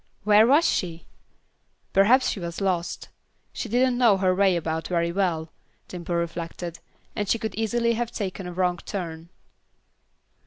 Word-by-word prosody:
Where 210 +2 +6
was 295 +6 +5
she? 170 -3 -2 0.9
Perhaps 235 +7 +5
she - - -5
was 170 -1 -5
lost. 185 -3 -2 0.4
She 235 - -5
didn't 245 +2 +2
know 230 -6 +5
her 185 -1 +2
way 190 -1 +3
about 160 -1 -2
very 170 -1 0
well, 170 -4 -1 0.4
Dimple 175 -1 -5
reflected, 170 0 -4 0.4
and 205 -2 -2
she - - +3
could 220 -1 -4
easily 235 +1 0
have 235 0 -2
taken 195 -4 -4
a - - -5
wrong 180 0 0
turn. 170 -3 -6
185 Hz, 150 wpm, -25 LUFS, 170-220 Hz, 0.9 s, Where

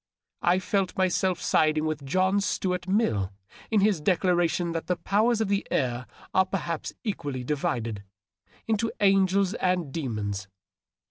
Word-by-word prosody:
I 175 +1 +3
felt 190 0 -1
myself 185 -1 +1
siding 155 0 +2
with 155 -2 -2
John 185 +7 +2
Stuart 180 -2 -1
Mill 150 - +1 0.4
in 215 -3 +3
his 200 -5 +2
declaration 175 0 +2
that 165 -1 -4
the 180 - +1
powers 215 +6 +1
of 220 - +1
the 200 0 0
air 125 -2 -1 0.3
are 190 - +5
perhaps 170 -4 -3
equally 145 - -3
divided 120 -7 -2 0.3
— 90 - -33
into 225 +1 0
angels 195 -1 +3
and 180 - 0
demons. 105 -9 -3
180 Hz, 140 wpm, -27 LUFS, 145-195 Hz, 0.4 s, are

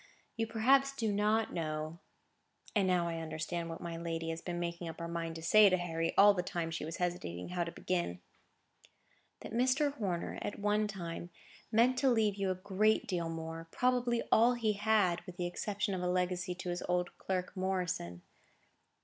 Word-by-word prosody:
You 225 0 -1
perhaps 270 +5 +3
do 225 -5 0
not 210 +2 +1
know" 155 0 -3 0.8
(and 200 -3 +3
now 180 -2 +2
I 165 -1 -3
understood 165 +1 -3
what 165 - -6
my 170 -1 -5
lady 165 -1 -3
had 165 0 -6
been 175 -1 -3
making 170 0 -3
up 160 - -8
her 170 - -4
mind 165 -1 -3
to 160 - -7
say 210 +4 +7
to 185 - +3
Harry, 165 -2 -1
all 205 +1 +8
the 180 - 0
time 170 -2 -3
she 165 - -3
was 160 +2 -5
hesitating 175 - -3
how 180 -1 -1
to 170 - -5
begin) 170 - -2 1.2
"that - - -8
Mr. 260 +4 +2
Horner, 190 -10 -3
at 205 - -4
one 210 +1 +1
time, 175 -3 -6 0.4
meant 240 +3 +4
to 270 - +4
leave 220 -4 +3
you 195 -1 -1
a 185 - 0
great 200 +3 +2
deal 175 -3 -2
more; 165 0 -6
probably 245 0 +1
all 235 +3 +5
he 225 -3 +1
had, 205 -4 +2
with 180 -1 -9
the 175 - -1
exception 205 +3 -2
of 185 - -2
a 180 - 0
legacy 180 0 0
to 185 0 -5
his 175 0 -2
old 180 0 0
clerk, 185 0 -2
Morrison. 180 - -2
180 Hz, 190 wpm, -33 LUFS, 170-210 Hz, 1.2 s, all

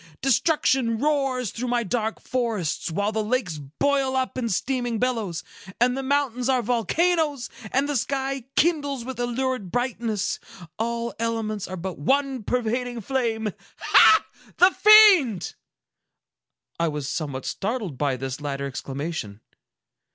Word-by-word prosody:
—destruction 265 -3 +2
roars 270 -4 0
through 250 +2 -4
my 240 -1 +1
dark 220 +2 -2
forests, 225 -13 -2
while 200 +5 -1
the 220 0 -1
lakes 210 - -1
boil 265 - 0
up 260 -1 -1
in 240 -3 -2
steaming 245 +3 -1
billows, 215 -8 -1 0.4
and 250 +1 +3
the 270 - -2
mountains 265 -2 0
are 255 -2 +2
volcanoes, 290 +4 0 0.2
and 270 +2 +1
the 290 - -2
sky 270 0 -2
kindles 285 -7 +1
with 260 -1 -6
a 245 - 0
lurid 255 -4 -2
brightness! 235 -4 -1 0.4
All 235 +1 -2
elements 220 -3 -2
are 185 - -6
but 180 -1 -6
one 270 - +1
pervading 245 +1 -2
flame! 225 -3 -1 0.3
Ha! 430 - +6 0.3
The 365 +2 +6
fiend!" 395 - +6 1.3
I 170 - +2
was 150 -3 -3
somewhat 140 -5 -4
startled 205 - -3
by 140 -3 0
this 130 +2 -5
latter 140 -1 -3
exclamation. 135 -5 -5
240 Hz, 135 wpm, -24 LUFS, 200-265 Hz, 1.3 s, Ha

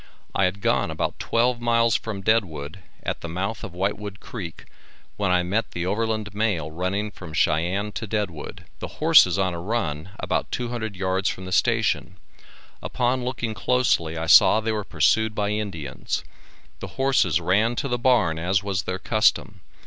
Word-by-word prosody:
I 95 - +2
had 95 +2 -2
gone - - +1
about - - -3
twelve 120 +1 +1
miles 115 -1 +3
from 105 -3 -3
Deadwood, 90 -7 0 0.2
at - - -3
the 85 - -6
mouth 100 +7 -3
of 90 - -7
Whitewood 100 +2 -3
creek, 90 -9 -8 0.5
when 100 -2 -1
I 90 -1 +3
met 100 +6 -1
the 85 0 -3
overland 110 +1 -1
mail 100 -8 -1
running 95 +5 -2
from 80 -5 -10
Cheyenne 90 +7 +1
to 110 +1 -5
Deadwood. 100 -8 -4
The - - -8
horses - - +6
on 95 -2 +1
a 85 - -5
run, 85 -5 -2
about - - -2
two 120 -1 -2
hundred 110 -4 -4
yards 95 +1 0
from 95 - -6
the 95 - -7
station; 95 - +1 0.6
upon 125 0 0
looking 120 -3 -3
closely 105 -10 +1
I 80 - -2
saw 105 - +7
they 110 0 -1
were 105 -1 -2
pursued 110 +2 +2
by 105 -1 0
Indians. 95 -11 -3 0.6
The - - -6
horses 130 - +2
ran 105 +8 +2
to 140 - -2
the 125 -2 -1
barn 115 -11 +3
as 95 +4 +1
was 100 -2 -1
their 95 0 -3
custom. 105 -2 +1
100 Hz, 170 wpm, -24 LUFS, 90-110 Hz, 0.6 s, saw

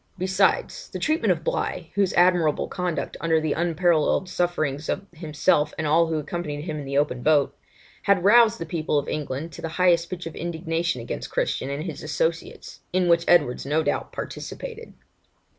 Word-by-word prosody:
Besides, 190 - +1
the - - -5
treatment 315 +2 +1
of - - -1
Bligh, - - -2
whose 200 -2 +2
admirable 175 -4 +3
conduct 180 -2 -3
under 165 -1 +2
the 155 -1 0
unparalleled 170 +1 +1
sufferings 155 -5 -1
of - - -2
himself 155 -2 +1
and 160 - -2
all 165 +3 +4
who 160 -1 -1
accompanied 150 -1 -4
him 155 -2 -4
in 145 - -6
the 140 +1 -2
open 140 -4 +1
boat, 150 0 +3 0.5
had 195 -3 +2
roused 230 +2 +6
the 165 - -5
people 155 -2 -1
of 145 - -1
England 150 +2 -4
to - - -10
the 165 - -3
highest 175 -2 +3
pitch 180 -2 -6
of 165 - -7
indignation 165 -3 -2
against 115 - -5
Christian 135 - -1
and 140 +2 -3
his 160 -5 -6
associates, 160 +2 -3
in 180 -1 +1
which 170 0 +4
Edwards 145 -8 +3
no 150 +3 +1
doubt - - -2
participated. 465 -1 -7
165 Hz, 175 wpm, -24 LUFS, 150-180 Hz, 0.5 s, roused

